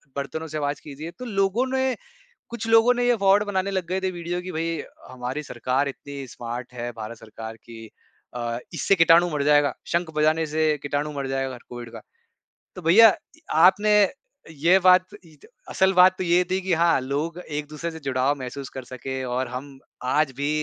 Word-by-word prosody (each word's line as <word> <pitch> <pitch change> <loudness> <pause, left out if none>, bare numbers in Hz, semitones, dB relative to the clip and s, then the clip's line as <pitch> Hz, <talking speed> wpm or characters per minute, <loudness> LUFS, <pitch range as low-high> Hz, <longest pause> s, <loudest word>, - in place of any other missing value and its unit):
बर्तनों 150 +3 -4
से 155 0 -5
आवाज 145 -1 -2
कीजिए। 150 +3 -8
तो 250 - -6
लोगों 200 +2 +1
ने 260 -1 +1 0.6
कुछ 230 -1 -5
लोगों 225 +2 +6
ने 245 0 0
ये 245 - +4
फ्रॉड 200 +1 +5
बनाने 200 -1 -1
लग 190 -3 -2
गए 185 +2 -2
थे, 190 0 -1
वीडियो 175 0 -4
कि 185 - -7
भाई 165 -1 -2 0.3
हमारी 130 +3 -5
सरकार 130 +1 -1
इतनी 140 0 -8
स्मार्ट 120 +1 -7
है 120 0 -4
भारत 110 +1 -7
सरकार 110 0 -9
कि 115 -1 -11 0.5
अ, 120 -1 -3 0.2
इससे - - +2
कीटाणु 165 0 +6
मर 150 -2 -1
जाएगा, 145 -2 +4
शंख 170 -1 -1
बजाने 155 +1 +2
से 155 0 +1
कीटाणु 145 +1 -2
मर 140 -2 -4
जाए 135 0 -1
अगर 130 -2 -5
कोविड 120 -1 -8
का। - - -8 0.8
तो 180 - -8
भैईया 195 +8 +8 0.3
इ - - -22 0.2
आपने 190 +6 +5 0.6
ये 165 +5 +4
बात 185 0 +5 0.2
इ 160 -2 -18 0.3
असल 190 0 +2
बात 185 +1 +6
तो 185 - -2
ये 175 +1 +3
थी 190 +1 +1
कि 190 -1 -1
हाँ, 170 -2 +3
लोग 150 +6 -3
एक-दूसरे 150 0 -5
से 160 - -9
जुड़ाव 135 0 0
महसूस 130 +1 -6
कर 130 - -8
सके 130 +1 -6
और 130 +1 -2
हम 135 +3 -8 0.3
आज 135 +3 +1
भी 140 +1 -1
155 Hz, 190 wpm, -24 LUFS, 135-180 Hz, 0.8 s, भैईया